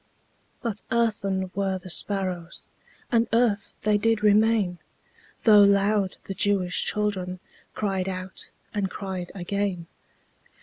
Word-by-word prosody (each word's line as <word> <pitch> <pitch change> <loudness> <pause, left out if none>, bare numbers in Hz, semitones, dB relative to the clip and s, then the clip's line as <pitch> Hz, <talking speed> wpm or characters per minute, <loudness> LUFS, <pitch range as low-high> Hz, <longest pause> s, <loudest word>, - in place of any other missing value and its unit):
But 220 -4 -3
earthen 200 -5 0
were 195 -1 0
the 185 0 -8
sparrows, 185 -3 -2 0.5
And 230 -1 +3
earth 225 -3 +2
they 210 0 +3
did 225 0 +1
remain, 210 -3 +3 0.6
Though 210 -2 +8
loud 200 0 +3
the 195 - -4
Jewish 190 -2 +1
children 190 -4 -1 0.4
Cried 195 -3 -1
out, 185 0 -6 0.2
and 200 -3 -1
cried 185 -2 -5
again. 195 -1 -2
200 Hz, 115 wpm, -26 LUFS, 185-210 Hz, 0.6 s, Though